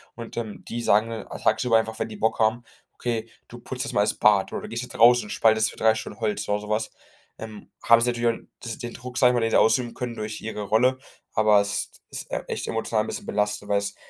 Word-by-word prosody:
und, 115 0 -9
ähm, 110 -3 -5
die 120 0 -3
sagen, 110 +3 +3
äh, 110 - -6 0.2
tagsüber 120 -3 +3
einfach, 110 0 -4
wenn - - -2
die 110 - -8
Bock 110 +1 +1
haben: 110 +2 +2 0.3
„Okay, 115 -2 -3 0.2
du 120 - -11
putzt 130 +2 -5
jetzt - - -5
mal 100 - +3
das 105 - +1
Bad.“ 105 -2 +3
oder: - - -3
„Du - - -7
gehst 115 +2 -4
jetzt 125 - -10
raus 120 +1 +7
und 105 - -9
spaltest 110 -1 +3
für - - -16
drei 110 0 +4
Stunden 105 - -7
Holz“ 110 -2 -2
oder 105 0 0
sowas, 105 +1 -2 0.5
ähm, 110 -2 -9
haben 115 0 +6
sie 120 - +2
natürlich 120 -1 0
auch - - -20 0.2
das 115 -2 -6
den 120 0 -6
Druck, 125 0 -8
sage 125 -3 +5
ich - - -1
mal, 120 - +1
den 115 - 0
sie - - +4
ausüben 115 +1 +2
können 120 -2 -4
durch 110 0 -5
ihre 110 -1 -5
Rolle, 125 +6 +2 0.3
aber 105 -2 +5
es 100 0 -3 0.2
ist, - - -7
äh, - - -2
echt, - - -4
emotional 110 -1 0
'n - - -7
bisschen - - -6
belastend, 105 0 -2
weil 100 0 +3
es 100 0 -5
110 Hz, 255 wpm, -25 LUFS, 105-120 Hz, 0.5 s, raus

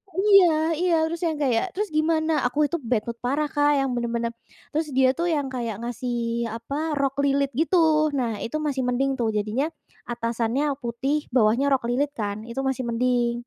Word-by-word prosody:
Iya 355 -5 +5
iya, 360 -1 +2
terus 335 +1 -5
yang 320 - -1
kayak 270 +6 0
terus 415 +1 -2
gimana, 315 0 +2
aku 295 +4 +1
itu 340 - 0
bad 230 -2 0
mood 235 0 -4
parah 285 +4 0
Kak, 290 0 +3
yang 270 -1 0
bener-bener 235 -1 -2 0.4
terus 310 +1 -1
dia 260 -1 +5
tuh 345 - 0
yang 290 -3 0
kayak 235 -4 -3
ngasih 235 -1 -2
apa, 290 +7 -3
rok 275 -1 0
lilit 280 0 +1
gitu. 325 +4 +2 0.4
Nah, 230 -5 -1
itu 230 - -5
masih 275 -3 -1
mending 270 +2 +1
tuh 235 - +1
jadinya 215 +7 0 0.4
atasannya 235 +4 -1
putih 270 +6 -2
bawahnya 235 +3 +3
rok 265 - +1
lilit 280 +4 0
kan 205 -1 -3
itu 235 +3 -5
masih 265 -1 -1
mending. 240 0 +1
265 Hz, 180 wpm, -24 LUFS, 235-300 Hz, 0.4 s, Iya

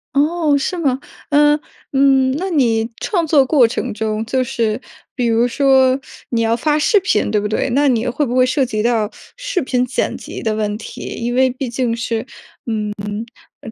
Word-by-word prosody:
哦， 300 0 +2
是 355 +6 -2
吗？ 270 -6 0 0.3
呃， 295 +1 +4 0.3
嗯， 270 -1 +4
那 375 +4 -3
你 230 -8 +1
创 350 -5 0
作 290 -3 +4
过 260 -3 +4
程 225 - -3
中， 220 0 -2
就 255 +2 0
是 230 -2 -1 0.4
比 250 - -1
如 230 +1 +3
说， 265 0 +3 0.3
你 235 -2 0
要 225 0 +2
发 300 +5 +1
视 405 +7 +4
频 365 - 0
对 210 0 +1
不 210 - -1
对？ 220 +5 -1
那 290 +1 +3
你 240 -2 +1
会 265 +4 0
不 245 -1 -3
会 255 0 +5
涉 260 +1 +1
及 215 -3 -2
到 225 -2 +1 0.3
视 - - -2
频 250 -2 0
剪 250 - -1
辑 - - -8
的 220 -1 -1
问 210 -1 -2
题， 220 - -9 0.2
因 240 +1 -2
为 260 0 +4
毕 255 0 -4
竟 235 -1 -1
是， 230 0 -3 1.4
嗯， - - -9
255 Hz, 200 characters per minute, -18 LUFS, 230-285 Hz, 1.4 s, 会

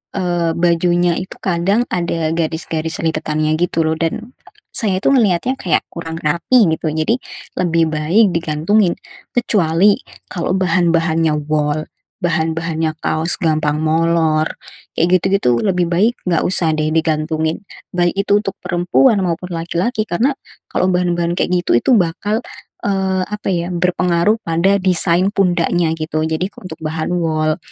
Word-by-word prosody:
eee, 175 -3 0
bajunya 175 0 +2
itu 185 - -7
kadang 190 +5 +1
ada 170 -3 -1
garis-garis 160 0 -3
lipatannya, 155 -1 0
gitu, 165 -2 +1
loh, 160 - +1
dan 220 +9 -3 0.4
saya 195 -5 0
itu - - 0
ngelihatnya 235 0 +2
kayak 180 - +1
kurang 165 -1 -6
rapi, 170 +8 +3
gitu. 160 - -5
Jadi, 155 +9 +1 0.4
lebih 165 -2 +2
baik 160 +8 +3
digantungin. 170 +4 +1 0.4
Kecuali, 200 -4 +3 0.4
kalau 175 0 -2
bahan-bahannya 165 -3 +2
wol, 150 0 0 0.4
bahan-bahannya 160 -1 -1
kaos 160 +2 0
gampang 155 -2 +1
molor, 160 -1 +2 0.5
kayak 175 +3 +3
gitu-gitu, 190 -12 +2
lebih 180 -3 +1
baik 210 +8 +2
enggak 170 - +2
usah, 175 -3 +1
deh, 155 0 0
digantungin, 160 +2 0 0.3
baik 175 -1 +1
itu 200 +1 +3
untuk 195 -3 -4
perempuan 180 +7 +2
maupun 175 +1 -3
laki-laki, 180 +7 -1
karena 235 +10 +1 0.4
kalau - - +1
bahan-bahan 175 -1 0
kayak - - 0
gitu, - - +1
itu 120 - +1
bakal, 195 +5 0 0.5
eee, 190 -2 0
apa, 210 +1 -6
ya, 175 0 -2
berpengaruh 180 +3 +1
pada 170 +4 +2
desain 180 0 +2
pundaknya, 175 -3 +1
gitu. 155 0 -2
Jadi, 160 +3 -1 0.2
untuk 185 - -8
bahan 155 +1 -3
wol, 155 -2 0
170 Hz, 135 wpm, -17 LUFS, 160-185 Hz, 0.5 s, rapi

